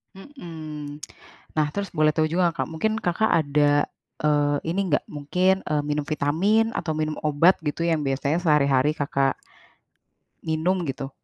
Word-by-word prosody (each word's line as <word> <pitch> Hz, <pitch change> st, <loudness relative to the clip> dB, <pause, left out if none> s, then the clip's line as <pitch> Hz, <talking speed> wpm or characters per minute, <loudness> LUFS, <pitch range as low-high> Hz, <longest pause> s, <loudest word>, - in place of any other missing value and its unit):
Mhm. 155 Hz, -, -9 dB, 0.6 s
Nah 155 Hz, -1 st, +3 dB
terus 200 Hz, -1 st, -3 dB
boleh 155 Hz, -2 st, +3 dB
tahu 155 Hz, -1 st, +2 dB
juga 175 Hz, +1 st, +3 dB
nggak 165 Hz, -, -19 dB
Kak, -, -, -9 dB
mungkin 215 Hz, +7 st, 0 dB
Kakak 210 Hz, +4 st, +1 dB
ada, 145 Hz, 0 st, +2 dB, 0.4 s
eee, 145 Hz, -1 st, +2 dB
ini 195 Hz, -, 0 dB
nggak -, -, +2 dB
mungkin, 180 Hz, +6 st, +1 dB
eee, 150 Hz, -1 st, +1 dB
minum 150 Hz, 0 st, -2 dB
vitamin 185 Hz, +10 st, +1 dB
atau 160 Hz, -, -3 dB
minum 155 Hz, 0 st, -2 dB
obat 155 Hz, +5 st, +4 dB
gitu 150 Hz, +3 st, -2 dB
yang 160 Hz, -3 st, 0 dB
biasanya 140 Hz, +4 st, 0 dB
sehari-hari 150 Hz, -4 st, +3 dB
Kakak 140 Hz, -2 st, 0 dB, 1.1 s
minum 165 Hz, +3 st, 0 dB
gitu. 135 Hz, 0 st, -4 dB
155 Hz, 150 wpm, -24 LUFS, 145-175 Hz, 1.1 s, obat